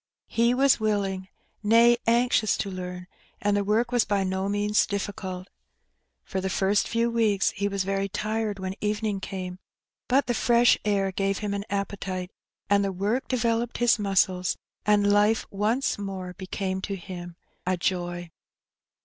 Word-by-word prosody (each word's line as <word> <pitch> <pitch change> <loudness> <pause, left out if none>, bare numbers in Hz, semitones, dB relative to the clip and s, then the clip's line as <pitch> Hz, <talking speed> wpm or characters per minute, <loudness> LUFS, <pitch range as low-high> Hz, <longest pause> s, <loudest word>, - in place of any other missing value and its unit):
He 235 +1 +2
was 270 0 +4
willing, 200 -3 -1 0.3
nay, 230 +3 +6
anxious 235 -2 +3
to 195 - -3
learn, 180 -1 -6 0.3
and 205 0 +1
the 205 - +1
work 225 +4 +1
was 245 -2 +3
by 200 -2 0
no 190 +1 -1
means 205 +1 +2
difficult. 195 -2 -4 0.8
For 190 - -3
the 190 - -2
first 195 +2 +2
few 235 0 +1
weeks 215 -4 +2
he 200 - -2
was 200 -1 -1
very 195 +1 -1
tired 215 +1 -2
when 190 0 -4
evening 210 -1 -1
came, 185 -1 -6 0.5
but 265 +2 +3
the 240 - 0
fresh 240 +1 +4
air 200 -2 +1
gave 195 +1 0
him 210 -2 -3
an 200 0 -3
appetite, 195 -2 -3 0.4
and 200 0 +3
the 195 - 0
work 205 +7 -1
developed 235 -1 0
his 240 -2 +3
muscles, 190 -2 +1 0.3
and 205 -1 +4
life 210 +2 +3
once 215 +5 0
more 190 -2 -5
became 190 +1 -3
to 195 - -3
him 175 -2 -8 0.3
a 185 0 +1
joy. 175 -1 -2
200 Hz, 160 wpm, -26 LUFS, 190-220 Hz, 0.8 s, nay